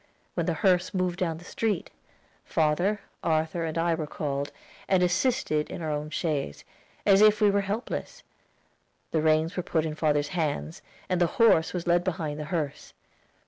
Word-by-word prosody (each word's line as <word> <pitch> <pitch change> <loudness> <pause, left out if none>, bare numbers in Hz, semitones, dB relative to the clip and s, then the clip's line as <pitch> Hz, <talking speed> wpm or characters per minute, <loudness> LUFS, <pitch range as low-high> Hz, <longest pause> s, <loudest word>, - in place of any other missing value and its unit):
When - - -1
the - - +1
hearse 185 -1 +2
moved 185 -1 0
down 165 -3 -1
the 170 - -12
street, 210 -2 -2 0.5
father, 175 +7 +1 0.2
Arthur, 160 +1 0
and 160 0 -3
I 170 0 +2
were 160 -2 -3
called, 145 -1 -3 0.4
and 185 -2 +3
assisted 180 - +1
in 170 - -6
our 155 - -1
own 150 +1 -3
chaise, 150 - -2 0.4
as 195 -1 +6
if 215 0 +6
we 210 -1 +5
were 200 0 +2
helpless; 205 +5 -4 0.9
the 160 - +1
reins 160 +3 +2
were 180 - 0
put 160 -2 0
in 155 - -2
father's 150 -2 +1
hands, 160 +1 -2 0.3
and 180 -1 0
the 175 - +5
horse 215 -8 +5
was 180 -2 -4
led 175 0 +3
behind 160 -5 -3
the 150 - -4
hearse. 150 -3 -3
165 Hz, 175 wpm, -27 LUFS, 155-185 Hz, 0.9 s, as